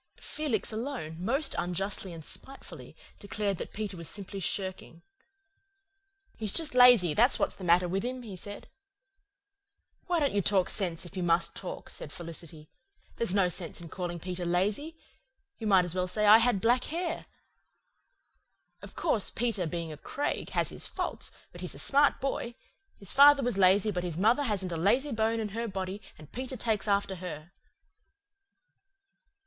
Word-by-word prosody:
Felix 275 -11 -2
alone, 215 - -5
must 270 +9 +1
unjustly 190 +2 -1
and 165 -2 -9
spitefully, 270 0 -7 0.2
declared 200 -2 -2
that - - -6
Peter 205 -2 -4
was 170 -3 -4
simply 200 0 -6
shirking. 185 -3 -4 1.4
"He's 215 -3 -1
just 315 +2 +2
lazy, 245 -10 +7
that's 240 - +4
what's - - 0
the 195 - -10
matter 175 +1 +4
with 190 +2 -1
him," 250 +1 -4
he 210 -5 -8
said. 205 +3 -7 1.4
"Why 350 -2 +1
don't 285 -6 +1
you 205 - +2
talk 195 -1 +2
sense, 180 -4 -2
if 175 - -12
you 185 - -2
must 170 0 +1
talk?" 185 - -6
said 145 - -7
Felicity. 165 -2 -7 0.5
"There's 215 -5 0
no 195 -3 +4
sense 175 -1 -4
in 170 -1 -10
calling 175 0 -4
Peter 180 +1 -5
lazy. 205 - -1 0.6
You 220 - -3
might 190 -3 +5
as 175 - -2
well 185 0 -1
say 210 +3 0
I 215 +2 +9
had 230 -4 +2
black 245 +2 +3
hair. 335 +1 -3 1.5
Of - - -12
course, 235 - +1
Peter, 220 -7 -1
being 165 -1 -4
a - - -10
Craig, 285 - -3
has - - +2
his - - -5
faults, - - -4 0.2
but - - -11
he's - - -4
a - - -9
smart 285 +1 +4
boy. 250 -3 -3 0.4
His 200 - -4
father 280 0 +7
was 245 -3 0
lazy 195 +2 +4
but 180 -2 -3
his 170 -3 -3
mother 225 +9 +3
hasn't 195 -6 -1
a 165 - -2
lazy 250 - +2
bone 225 0 0
in 215 -1 -2
her 230 +3 -3
body, 190 0 -4 0.2
and 150 -1 -14
Peter 260 +1 -5
takes 220 -2 -1
after 200 -2 +1
her." 175 -2 -8
200 Hz, 170 wpm, -29 LUFS, 180-235 Hz, 1.5 s, I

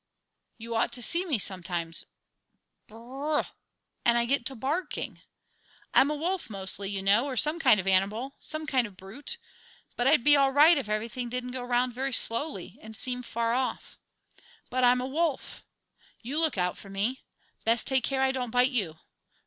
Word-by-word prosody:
You 230 +1 -7
ought 225 +1 +1
to 245 - -3
see 345 +9 +3
me 300 -9 0
sometimes 175 -4 -2 0.8
b 215 - -16
r - - -11
r 270 +6 -5
r 295 - +3
h! - - -11 0.6
and 235 0 +4
I 235 - +3
get 260 -1 +1
to 270 - -4
barking! 285 +10 -3 0.7
I'm 275 - +5
a 300 - -1
wolf 345 +1 -2
mostly, 195 -1 -3
you 195 -1 -3
know, 210 +7 +4
or 260 -2 -4
some 305 +6 +3
kind 215 -9 +5
of 190 - -3
an 195 - +3
animal, 215 +8 +1
some 310 0 -3
kind 260 -5 +1
of 205 - -15
a - - -25
brute. 245 - -7 0.6
But 245 - +1
I'd 280 -3 +4
be 295 +2 +7
all 275 -1 +4
right 300 +5 +7
if 275 -8 -3
everything 230 +3 -3
didn't 250 +1 -4
go 255 0 -4
round 245 0 0
very 265 +2 -2
slowly, 245 +7 0
and 220 0 -10
seem 250 +2 -3
far 230 -1 -2
off. 255 +1 -3 0.7
But 255 +1 0
I'm 250 0 +5
a - - -3
wolf. 310 +1 -2 0.6
You 275 +7 -2
look 320 -8 +2
out 180 0 -1
for 200 - -12
me; 205 +7 -2 0.4
best 230 +1 +2
take 265 -2 +2
care 265 +1 0
I 265 - +3
don't 255 -2 -3
bite 250 +3 +3
you! 190 - -1
250 Hz, 200 wpm, -28 LUFS, 220-275 Hz, 0.8 s, be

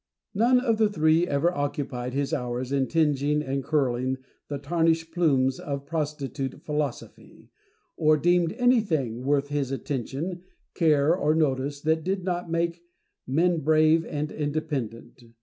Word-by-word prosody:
None 240 +5 +4
of 230 -4 0
the 215 -1 +4
three 160 -1 +3
ever 160 +4 +1
occupied 140 -4 -3
his 140 +2 -1
hours 125 -2 -3
in 135 -2 +1
tingeing 150 -2 +1
and 135 -1 -2
curling 130 -3 0 0.3
the 145 - -4
tarnished 165 +2 0
plumes 135 -7 +2
of 140 -1 -5
prostitute 145 -3 -4
Philosophy, 150 -3 -5 0.5
or 155 0 +4
deemed 175 +2 +2
anything 170 - +1
worth 145 +1 +1
his 145 -3 -1
attention, 140 +6 -4 0.3
care, 155 -2 +3
or 155 -3 +1
notice, 140 -2 0
that 160 +1 +1
did 190 +1 -2
not 175 -2 -2
make 170 +1 -1 0.5
men 165 +6 +2
brave 155 +2 +4
and 150 -1 -4
independent. 145 -6 -4
150 Hz, 135 wpm, -26 LUFS, 140-165 Hz, 0.5 s, None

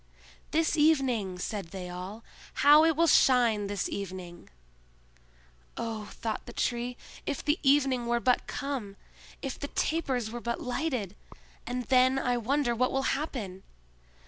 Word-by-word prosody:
"This 320 +1 +1
evening!" 265 - +2
said 195 0 -4
they 180 +1 -7
all; 185 +5 -7 0.4
"how 295 +2 +9
it 325 -1 +3
will 335 +3 +4
shine 240 -9 +4
this 200 -1 -2
evening!" 185 -3 -7 1.3
"Oh," 220 -2 -4
thought 225 -2 -4
the 240 - -8
Tree, 245 +1 -2 0.3
"if 285 - -3
the 300 +2 +2
evening 270 -3 +3
were 240 0 +2
but 250 +1 +1
come! 255 -8 -4 0.5
If 270 -2 -4
the 285 - -4
tapers 265 -9 -1
were 240 0 -6
but 235 0 -2
lighted! 250 - -2 0.5
And 250 0 -2
then 255 +2 +4
I 250 -2 +1
wonder 250 +2 +1
what 255 +2 +1
will 270 0 0
happen! 230 -10 -4
245 Hz, 145 wpm, -29 LUFS, 210-275 Hz, 1.3 s, how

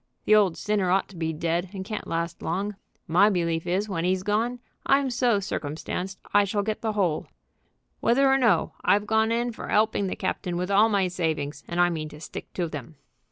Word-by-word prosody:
The 215 - +4
old 200 -5 +4
sinner 205 -3 0
ought 190 +2 +2
to 195 - -13
be 160 -1 -2
dead, 170 +3 -1
and 190 -1 -5
can't 215 +1 -5
last 170 0 -3
long. 205 +2 -2 0.3
My 185 +6 +5
belief 170 -3 -1
is 190 +4 0
when 175 -5 -2
'e's 185 +1 +1
gone 225 +5 0 0.3
I'm 275 -1 +3
so 240 -3 +2
circumstanced 185 +1 -4
I 205 - +6
shall 200 +1 -1
get 215 +1 -3
the 220 -1 -1
whole. 180 -7 0 0.7
Whether 270 +4 +3
or 270 0 +4
no, 235 -5 +2
I've 205 +1 +3
gone 220 +1 +2
in 240 +1 0
for 230 - -8
'elping 215 -2 +2
the - - -3
captain 175 -1 -2
with 180 +2 -2
all 210 +3 +5
my 200 -3 +2
savings, 160 -5 -2
and 170 0 -3
I 175 0 +4
mean 155 -2 -4
to 150 - -12
stick - - -8
to 175 -2 -1
them." 150 -1 -8
190 Hz, 205 wpm, -26 LUFS, 170-215 Hz, 0.7 s, I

